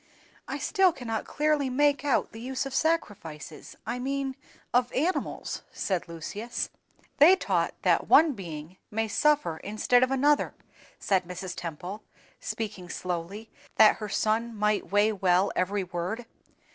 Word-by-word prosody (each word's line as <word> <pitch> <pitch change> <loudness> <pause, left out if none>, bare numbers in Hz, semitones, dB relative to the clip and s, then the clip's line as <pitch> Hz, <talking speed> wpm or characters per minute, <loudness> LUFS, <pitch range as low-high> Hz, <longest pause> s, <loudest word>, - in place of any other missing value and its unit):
"I - - -3
still 385 -3 +3
cannot 225 -7 -4
clearly 300 -2 +1
make 285 +2 +2
out 285 -4 +1
the 225 - -10
use 260 +2 -3
of 275 - -6
sacrifices—I 205 - -3
mean 270 +1 -2 0.4
of 245 0 +3
animals," 335 +8 -1
said 185 -3 -2
Lucius. 200 +8 -4 0.5
"They 330 +6 +9
taught - - 0
that - - +3
one 315 -1 +6
being 170 - -8
may 225 +1 -1
suffer 290 - +2
instead 215 +6 +2
of 255 - +3
another," 285 +2 +2 0.4
replied 190 -2 +1
Mrs. 180 0 -6
Temple, 175 +5 -6 0.4
speaking 205 -5 -5
slowly, 180 +6 -5 0.2
that 215 -1 +7
her 210 -1 -5
son 225 +3 0
might 210 -1 0
weigh 205 +2 +4
well 190 -2 +2
every 195 +2 0
word. 180 +6 -4
220 Hz, 135 wpm, -28 LUFS, 185-270 Hz, 0.5 s, They